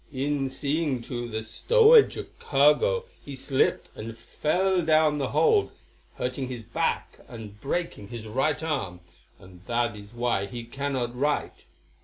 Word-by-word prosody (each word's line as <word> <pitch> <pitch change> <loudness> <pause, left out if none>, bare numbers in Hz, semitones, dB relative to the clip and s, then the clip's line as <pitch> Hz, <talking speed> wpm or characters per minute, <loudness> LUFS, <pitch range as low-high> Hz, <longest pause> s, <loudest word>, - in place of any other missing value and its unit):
"In 140 0 -1
seeing 140 -2 -1
to 120 0 -5
the 110 0 -4
stowage 455 - +5
of - - -9
cargo 150 - +3 0.2
he 140 - -7
slipped 135 0 0
and 115 +1 -7
fell 180 +10 0
down 155 -1 +3
the 135 - 0
hold, 440 -3 +3 0.5
hurting 130 +1 -3
his 125 -3 -6
back 115 +2 -2
and 105 -3 -10
breaking 145 - -3
his 115 -1 -8
right 135 +8 0
arm, 95 - -3 0.4
and 90 -1 -16
that 120 -1 0
is 100 0 -12
why 120 -4 -1
he 120 +4 -7
cannot 125 0 -3
write. 145 +4 -1
130 Hz, 145 wpm, -26 LUFS, 115-150 Hz, 0.5 s, stowage